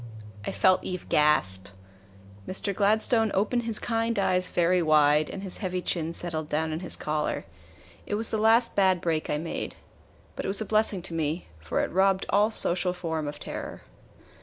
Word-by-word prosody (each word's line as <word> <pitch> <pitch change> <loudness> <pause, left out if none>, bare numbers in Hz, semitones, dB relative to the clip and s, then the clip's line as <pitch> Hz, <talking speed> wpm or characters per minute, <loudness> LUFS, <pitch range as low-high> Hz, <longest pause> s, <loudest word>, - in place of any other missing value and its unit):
I - - -2
felt 185 -1 +3
Eve 185 -1 -5
gasp. 95 -11 +3 0.8
Mr. 200 +1 -3
Gladstone 220 +3 +2
opened 235 +4 0
his 225 -2 -1
kind 230 -1 -1
eyes 185 -2 +1
very 175 +1 +2
wide, 150 -1 +4
and 195 - -7
his 190 - -5
heavy 185 -3 -2
chin 165 -2 -2
settled 160 -3 -3
down 160 +1 -1
in 155 - -3
his 180 - -2
collar. 150 0 -2 0.6
It 205 - -1
was 220 +2 0
the 220 - 0
last 225 +2 +3
bad 190 -2 +3
break 165 -2 -1
I 150 - 0
made. 165 +2 -5 0.6
But - - -5
it - - -2
was 195 +1 +4
a 220 - -1
blessing 215 -4 +1
to 175 - -6
me, 160 +1 -2
for 80 0 -2
it - - -2
robbed 190 +1 +2
all 210 +2 +4
social 180 -4 +1
form 160 -4 -3
of 145 - -6
terror. - - -7
180 Hz, 185 wpm, -27 LUFS, 160-205 Hz, 0.8 s, wide